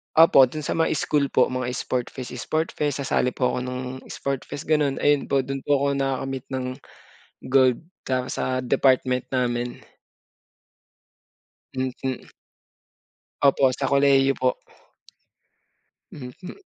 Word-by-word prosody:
Opo, 155 -5 +7
dun 155 +4 -6
sa 160 - -2
mga 160 - +2
school 145 0 +1
po, - - +2
mga 130 -1 -2
sport 125 -1 -2
fest-sport 130 +5 -3
fest, 145 -2 -2
sasali 125 -1 0
po 125 - +1
ako - - -2
ng 125 +1 -6
sport 140 -1 -4
fest 145 - -6
gano'n. 150 -3 +1
Ayun 145 -1 +3
po, 135 -1 +1
dun 135 +1 -4
po 145 - +4
ako 140 0 +1
nakakamit 135 -1 -2
ng 130 -1 -2 0.9
gold, 130 +2 +4 0.2
tapos 130 -1 -2
sa 130 0 -1
department 130 -1 +2
namin. 120 -1 -2 1.9
Mhm. 130 0 -4 1.1
Opo, 135 -1 +4
sa 135 - -2
kolehiyo 140 -1 +4
po. 130 -1 +2 1.6
Mhm. 150 - -10
130 Hz, 125 wpm, -24 LUFS, 125-140 Hz, 1.9 s, Opo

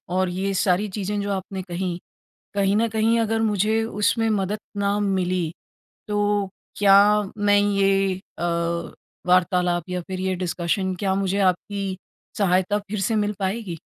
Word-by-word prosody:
और 185 0 +2
ये 190 +2 -2
सारी 190 +2 +2
चीज़ें 205 0 -2
जो 200 - -2
आपने 190 0 -4
कहीं, 175 -1 -3 0.6
कहीं 200 0 +2
न 230 +2 +2
कहीं 225 +1 +2
अगर 225 0 0
मुझे 215 +1 +1
उसमें 225 +1 +1
मदद 205 0 0 0.2
ना 200 0 +1
मिली 185 -4 0 0.6
तो 205 -1 +1 0.3
क्या 200 -1 +5 0.4
मैं 205 0 +4
ये 195 -1 +2 0.2
अ, - - -4 0.8
वार्तालाप 180 -1 +2
या 180 0 -2
फ़िर 185 +2 -6
ये 190 0 0
डिस्कशन 180 +2 -1
क्या 195 -2 +1
मुझे 195 0 0
आपकी 195 +1 -4 0.4
सहायता 190 +1 +2
फ़िर 205 0 -5
से 225 - 0
मिल 210 0 +1
पाएगी? 190 -3 -3
195 Hz, 145 wpm, -23 LUFS, 185-205 Hz, 0.8 s, क्या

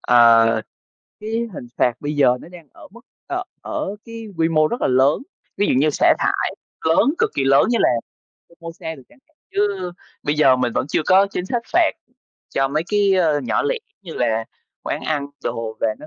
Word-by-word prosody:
ờ, 115 -2 +6 0.7
cái 215 - -7 0.2
hình 125 - -8
phạt 125 - +3
bây 150 +1 -3
giờ 125 -3 +4
nó - - -12
đang 175 -3 -14
ở - - -14
mức 235 +3 -15 0.3
ờ, 360 +1 -2 0.2
ở 200 - -4
cái 230 -1 -8
quy 165 0 +2
mô 155 -1 +3
rất 240 - -4
là - - +2
lớn, 130 +3 +3 0.4
ví 205 - +2
dụ - - +2
như 150 +3 +3
xả 150 - +4
thải - - 0 0.3
lớn 275 - +4
cực - - +2
kỳ 140 - +1
lớn 135 +1 +5
như 240 - +2
là - - +4 0.6
Fomosa 165 -1 -8
đi 135 - -14
chẳng 295 - -22
hạn. 315 - -37 0.2
Chứ 200 -3 -1 0.3
bây 145 0 0
giờ 135 -4 +5
mình 125 -2 -1
vẫn - - -1
chưa 155 - 0
có 190 +2 +5
chính 185 -2 -5
sách 240 +1 -2
phạt 345 -1 +4 0.6
cho 135 0 +2
mấy 155 +3 0
cái, 205 -2 +3
ơ, 160 -5 +2
nhỏ 125 - 0
lẻ 485 +3 0 0.3
như 170 -4 -8
là 115 -2 0 0.4
quán - - -3
ăn 145 -3 -1 0.2
đồ 115 -2 -3
và - - +2
nó - - -10
155 Hz, 210 wpm, -21 LUFS, 135-200 Hz, 0.7 s, ờ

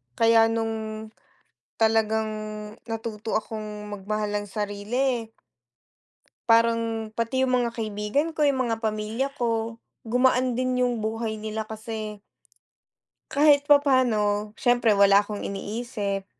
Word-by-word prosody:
Kaya 230 0 +5
nung 220 -1 -2 0.7
talagang 220 -1 +2 0.6
natuto 225 -1 -3
akong 210 -1 -6
magmahal 210 +1 -3
ng 205 - -9
sarili 220 +4 -2 1.2
parang 230 -1 +2
pati 230 +4 0
yung 255 - +1
mga 235 - -1
kaibigan 220 +8 -1
ko 310 - -1
yung 270 -3 +2
mga 225 -1 -2
pamilya 220 +5 -1
ko 230 -1 -1 0.2
gumaan 250 +1 +2
din 255 0 +1
yung 245 -2 +1
buhay 220 0 -3
nila 215 +1 -4
kasi 215 -1 -6 1.1
kahit 285 0 +5
papano 240 -8 +3
syempre 240 -3 +3
wala 200 0 +6
akong 205 0 -6
iniisip. 200 -1 -4
225 Hz, 110 wpm, -25 LUFS, 215-240 Hz, 1.2 s, wala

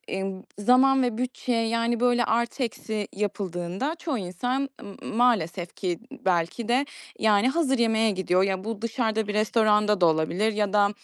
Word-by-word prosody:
ımm, 190 0 -4 0.2
zaman 260 +5 +4
ve 240 -3 -1
bütçe 250 -1 -2
yani 230 +1 0
böyle 245 0 +3
artı, 235 +4 0
eksi 220 -2 -4
yapıldığında 195 - -3
çoğu 305 -7 -2
insan 245 +9 -2 0.3
m - - -8
maalesef 190 -8 +1
ki 180 -3 -3
b 275 - -13
belki 180 +5 0
de 255 +4 +2 0.3
yani, 215 +1 +3
hazır 270 -2 +1
yemeğe 225 -1 +2
gidiyor. 185 -1 +1
Ya, 190 -1 -1
bu 220 -1 -5
dışarıda 225 -2 -1
bir 210 - -3
restoranda 210 -2 +2
da - - +6
olabilir 170 +7 +1
ya 210 -1 -1
da, 205 -1 +4
220 Hz, 165 wpm, -25 LUFS, 195-240 Hz, 0.3 s, da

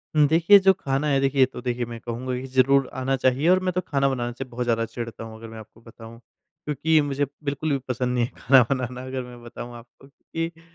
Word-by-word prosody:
हुँ, 150 -1 +6
देखिए 170 +6 +6
जो 190 - +7
ख़ाना 140 -5 -2
है, 140 -2 +2
देखिए 135 -1 +3
तो 125 -1 -9
देखिए 120 0 -2
मैं 115 0 -8
कहूँगा 120 +2 -4
कि 130 - -7
ज़रूर 130 +1 +3
आना 130 +1 0
चाहिए। 130 +4 +1
और 185 - +5
मैं 185 - 0
तो 180 - 0
ख़ाना 140 -4 0
बनाने 120 -2 -3
से - - -3
बहुत 125 0 -4
ज़्यादा 115 -1 0
चिढ़ता 115 -1 -7
हूँ 110 0 -9
अगर 115 - -10
मैं 115 0 -10
आपको 110 +1 -15
बताऊँ। 115 0 -13 0.5
क्योंकि 155 +2 +2
मुझे 145 0 -1 0.2
बिल्कुल 150 +2 -2
भी 140 - +2
पसंद 125 0 -1
नहीं 120 -1 +2
है - - -9
ख़ाना 130 +1 +6
बनाना 125 -2 -3
अगर 130 -1 -4
मैं 125 -1 -12
बताऊँ 120 0 -9
आपको। 120 +3 -17
क्योंकि 165 +3 -6
130 Hz, 235 wpm, -24 LUFS, 120-140 Hz, 0.5 s, जो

